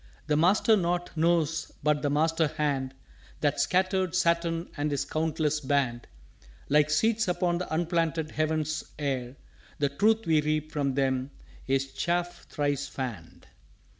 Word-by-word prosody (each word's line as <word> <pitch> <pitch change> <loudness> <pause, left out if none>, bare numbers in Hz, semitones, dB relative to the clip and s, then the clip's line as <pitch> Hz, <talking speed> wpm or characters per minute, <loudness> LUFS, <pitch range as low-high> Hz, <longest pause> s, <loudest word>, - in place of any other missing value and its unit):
_" - - -32 0.2
"The 150 - +1
Master 190 +7 +4
knot 175 -2 -1
knows 165 -1 +1
but 150 -1 +2
the 145 - 0
Master 160 +2 +2
hand 135 -3 -2 0.5
That 145 -2 +1
scattered 185 -1 +1
Saturn 170 -1 +1
and 145 0 -1
his 140 -2 -1
countless 155 -1 0
Band 130 -4 -1 0.6
Like 150 +1 +4
seeds 220 +8 +2
upon 175 -1 0
the 180 - -5
unplanted 165 -1 0
heaven's 155 0 -1
Air: 135 -4 -3 0.4
The 145 -1 +1
Truth 220 +10 +2
we 160 -2 +3
reap 155 0 -1
from 140 -3 -1
them 130 -1 0 0.4
is 135 0 0
Chaff 175 0 -2
thrice 145 -1 -1
fanned." 115 -14 -7
155 Hz, 140 wpm, -28 LUFS, 145-170 Hz, 0.6 s, Master